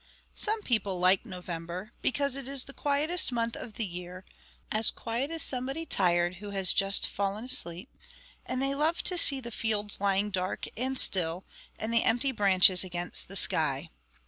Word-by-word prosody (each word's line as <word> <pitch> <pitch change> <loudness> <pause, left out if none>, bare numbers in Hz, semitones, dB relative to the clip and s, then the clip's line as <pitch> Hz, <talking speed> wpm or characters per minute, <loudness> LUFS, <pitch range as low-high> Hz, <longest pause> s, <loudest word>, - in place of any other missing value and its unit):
Some 430 0 0
people 200 -6 0
like 185 +5 +2
November, 180 +1 -7
because 280 0 0
it 275 -2 -6
is 275 -1 -2
the 275 - -12
quietest 295 +4 +2
month 230 -1 -2
of 225 - -8
the 225 - -3
year 180 0 -9 0.5
as 215 +1 +3
quiet 235 +5 -4
as 330 -2 -2
somebody 270 +5 -2
tired, 175 - +1
who 205 +2 -9
has 195 -2 +1
just 195 0 +2
fallen 200 +3 -3
asleep 175 -3 0 0.5
and 255 - -4
they 275 0 -1
love 310 +4 0
to 365 - +2
see 285 -5 +7
the 235 -2 -9
fields 210 -2 0
lying 200 +1 0
dark 185 -1 -3
and 260 +3 -2
still, 175 -3 +2 0.3
and 220 +1 -4
the 230 - +4
empty 245 +4 +1
branches 190 -4 +4
against 175 -1 -2
the - - -11
sky. - - +1
215 Hz, 170 wpm, -28 LUFS, 185-265 Hz, 0.5 s, see